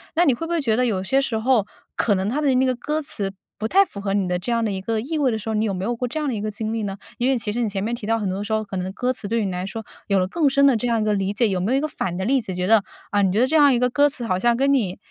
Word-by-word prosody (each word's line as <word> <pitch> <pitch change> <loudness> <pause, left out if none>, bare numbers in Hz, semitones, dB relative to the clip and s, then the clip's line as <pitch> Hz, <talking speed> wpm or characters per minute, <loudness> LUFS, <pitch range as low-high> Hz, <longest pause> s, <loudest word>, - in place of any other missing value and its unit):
那 345 +2 +4
你 275 - +4
会 330 +8 -4
不 - - -6
会 340 - +1
觉 230 -7 +1
得 250 - +2
有 195 -5 -1
些 270 +8 +2
时 235 -4 -2
候， 220 -2 +2 0.3
可 210 - +2
能 190 +1 -1
它 285 +7 -1
的 270 -3 +2
那 260 - +3
个 255 - +2
歌 300 +6 -2
词 205 -9 -4 0.3
不 220 - -1
太 390 - +5
符 200 - -9
合 200 -1 -1
你 195 -3 +1
的 180 0 -1
这 240 - -4
样 230 -1 +1
的 210 - -1
一 190 - -3
个 220 +2 -1
意 285 +8 -4
味 275 - +3
的 220 - -1
时 220 - -9
候， 220 - -1
你 215 0 +1
有 200 -3 -1
没 185 +2 -3
有 240 - -1
过 250 +2 -2
这 310 +6 -4
样 300 - -2
的 260 - -1
一 210 - -3
个 215 - -2
经 220 +1 -4
历 225 - -2
呢？ 200 -2 -4 0.2
因 245 - +2
为 265 - +2
其 225 -2 -2
实 240 +3 -2
你 225 - 0
前 195 -1 -3
面 230 +3 -2
提 230 -3 -5
到 225 0 +2
很 210 -3 -2
多 190 +2 -2
时 215 - -6
候， 220 0 +1
可 195 -2 -6
能 185 +1 -3
歌 250 +4 -1
词 205 - -7
对 230 0 0
你 190 - -2
来 180 0 -3
说 225 +2 -6 0.2
有 200 - +2
了 185 -1 +2
更 295 - +2
深 280 +1 +3
的 275 -3 +5
这 230 +2 -1
样 230 -1 +1
一 - - 0
个 215 0 +1
理 195 0 -1
解。 225 +1 +2
有 185 - -1
没 200 +6 0
有 265 - +3
一 - - +1
个 310 - -1
反 180 - -4
的 190 - -2
例 265 +1 +2
子， 190 -4 -6
觉 180 - -1
得， 215 +1 +4 0.3
啊， 205 - +2
你 190 -2 +2
觉 205 - +1
得 250 - +5
这 310 +5 -1
样 290 -2 +6
一 245 - +3
个 250 0 +1
歌 285 +3 +4
词 255 -4 -6
好 185 -4 0
像 235 +3 +2
跟 275 +2 +3
你 205 -9 0
225 Hz, 415 characters per minute, -22 LUFS, 200-255 Hz, 0.3 s, 样